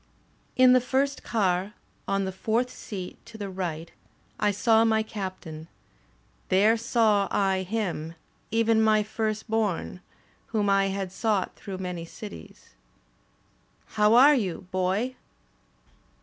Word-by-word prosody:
In 255 0 +6
the 255 - +5
first 270 +3 0
car, 195 -2 0 0.3
on 195 0 0
the 190 - -3
fourth 225 +6 -1
seat 185 -4 -8
to 230 -1 -11
the 200 -2 -5
right, 170 -3 -4 0.5
I 210 - +2
saw 220 +2 +3
my 220 -1 +2
Captain; 185 -7 -7 0.8
there 205 +4 +4
saw 220 -3 +2
I 195 -2 +1
him, 180 -5 -3 0.3
even 225 0 +2
my 215 -1 +4
firstborn, 215 -4 -2 0.5
whom 210 -3 0
I 195 0 +3
had 195 -1 -3
sought 205 -1 -1
through 195 -2 -7
many 180 -2 -5
cities. 205 +5 -11 1.2
"*How 210 +1 +3
are 275 +5 +8
you. 195 - -2
Boy? 190 +7 -1
205 Hz, 120 wpm, -26 LUFS, 185-225 Hz, 1.2 s, are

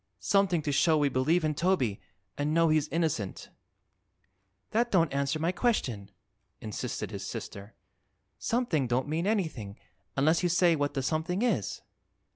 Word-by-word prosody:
"Something 185 - +2
to 145 - -1
show 155 +3 +3
we 145 -1 +2
believe 155 +6 +2
in 155 - +1
Toby 145 - 0 0.3
an' 150 +2 -1
know 165 -1 +4
he's 155 -1 +2
innocent." 155 - -2 1.2
"That 235 +2 +2
don't 165 -8 +2
answer 140 +2 0
my 165 +3 0
question," 130 - -1 0.5
insisted 105 -2 -4
his - - -6
sister. 100 +2 -7 0.6
"Something 225 - 0
don't 125 +3 0
mean 165 +5 -1
anything, 155 - -2 0.4
unless 155 +4 +3
you 175 - +1
say 175 -1 +4
what 145 -1 -1
the 135 - -1
something 160 - -1
is." 210 - -1
155 Hz, 145 wpm, -29 LUFS, 135-175 Hz, 1.2 s, know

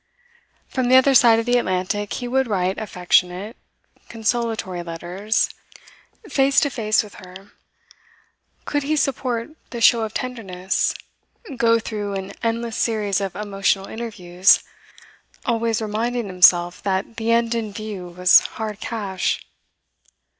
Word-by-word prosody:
From 255 -2 -1
the 255 - +6
other 260 +1 +6
side 235 -3 +6
of 225 - -1
the 245 0 +3
Atlantic 190 +1 -2
he 245 - -4
would 265 +1 +1
write 190 -3 -1
affectionate, 180 +1 0 0.5
consolatory 225 -5 -2
letters; 175 +6 -2 0.8
face 275 -4 +3
to 285 - 0
face 215 -4 +1
with 210 - -13
her, 190 +2 -13 1.1
could 290 - -1
he 295 +3 -1
support 255 -3 -1 0.2
the 235 - -6
show 230 0 +5
of 220 -1 -4
tenderness, 190 -7 -2 0.6
go 230 -1 +3
through 210 -3 -4
an 190 0 -5
endless 230 0 -2
series 210 -4 0
of 195 -2 -4
emotional 195 -1 0
interviews, 195 -5 +2 0.8
always 230 -2 0
reminding 230 +3 -2
himself 180 -2 +4
that 195 +3 -2
the 225 0 0
end 230 0 +2
in 225 -3 -3
view 205 -3 -6
was 180 +1 +5 0.2
hard 215 -2 -4
cash? 200 -5 -2
215 Hz, 130 wpm, -22 LUFS, 190-235 Hz, 1.1 s, the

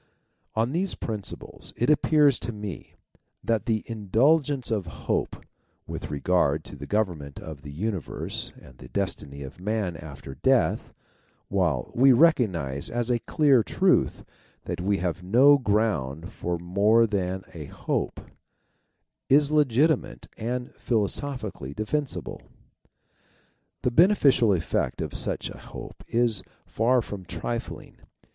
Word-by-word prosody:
On 115 +3 +1
these 180 +5 0
principles 105 -3 -6
it 120 +5 +3
appears 150 -2 +4
to - - -3
me 105 -4 -7 0.5
that 115 -3 0
the 110 -2 +1
indul 115 - +3
gence 140 -4 -4
of 100 -6 -1 0.2
hope - - -1 0.4
with - - -6
regard 75 0 +1
to - - -11
the - - -8
government 85 -10 -2
of 80 -3 -8
the 70 - -9
universe 95 +2 -3
and 65 -1 -16
the - - -11
destiny 75 -8 -3
of 70 +4 -10
man 105 -3 -1
after 70 -4 -9
death, - - +1 0.6
while 85 -10 0
we 135 +3 +6
recognize 95 - +2
as 120 +1 -1
a 120 - +2
clear 140 -2 +3
truth - - +1 0.4
that - - -4
we 100 +2 +1
have 90 -1 -2
no 130 +10 +6
ground 100 - 0
for 90 0 -3
more 100 +7 +3
than 95 -3 -2
a 80 -4 -7
hope, - - -3 1.1
is 145 +2 +5
legitimate 150 - +2
and 125 +2 -4
philo 110 -4 +1
sophically 105 - -5
defensible. 140 +6 -3 1.4
The 125 - +2
beneficial 140 - +5
effect 85 -4 0
of - - -3
such - - -3
a - - -10
hope - - -10
is 115 -4 +2 0.2
far 120 +2 +2
from 100 -3 -7
trifling. 115 +6 -5
110 Hz, 130 wpm, -26 LUFS, 90-125 Hz, 1.4 s, we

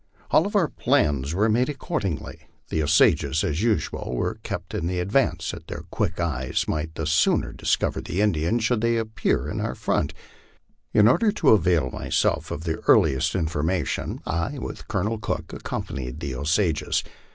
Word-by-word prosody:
All 170 +6 +4
our 175 -5 +3
plans 75 - +1
were 105 +4 +3
made 120 +4 +2
accordingly. 100 - -4 0.2
The 80 - 0
Osages, 80 +1 +3
as 75 +4 -1
usual, 110 - -1
were - - -2
kept - - -6
in 85 - -2
the 90 0 -1
advance, 100 +10 +1
that - - -10
their - - -6
quick - - -1
eyes 65 -7 -1
might 80 +1 -2
the 80 - -3
sooner 80 +1 +2
discover - - 0
the 90 - -4
Indians 105 +2 +1
should 115 -1 +1
they 115 0 +2
appear 110 -1 -1
in - - -3
our - - -2
front. - - -1 0.8
In 105 0 +5
order 210 - +4
to 160 -8 +2
avail 85 -9 +3
myself - - 0
of 80 - -5
the 80 -2 -2
earliest 65 +6 +4
in 90 -4 +1
formation, 80 +3 -2
I, 85 - -2
with - - -7
Colonel 110 +1 -1
Cook, 110 - -4
accompanied 60 -2 -5
the 70 -3 -4
Osages. 80 +5 0
85 Hz, 165 wpm, -24 LUFS, 80-110 Hz, 0.8 s, In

